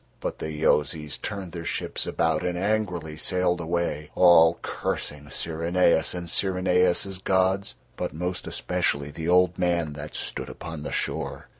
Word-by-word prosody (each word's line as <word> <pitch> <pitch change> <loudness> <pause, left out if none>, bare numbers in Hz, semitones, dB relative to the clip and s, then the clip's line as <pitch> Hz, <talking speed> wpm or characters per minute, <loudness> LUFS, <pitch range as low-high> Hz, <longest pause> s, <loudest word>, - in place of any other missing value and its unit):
But - - -4
the 80 - -4
Yozis 75 0 +1
turned 100 -4 -5
their 85 0 -6
ships - - -3
about 80 -2 +1
and 90 -1 -1
angrily 90 -5 -1
sailed 90 +2 +1
away, 85 -3 -2
all 85 -2 +7
cursing 75 0 -3
Syrinais 85 +2 +1
and 90 -1 -4
Syrinais's 90 +1 +2
gods, 95 +1 +1 0.2
but - - -2
most 90 +3 -3
especially 70 +1 -1
the 80 +3 -4
old 90 0 +4
man 85 -4 +1
that 75 +1 -8
stood - - -3
upon 80 -2 -7
the 75 - -5
shore. 70 0 -3
85 Hz, 145 wpm, -26 LUFS, 80-90 Hz, 0.2 s, all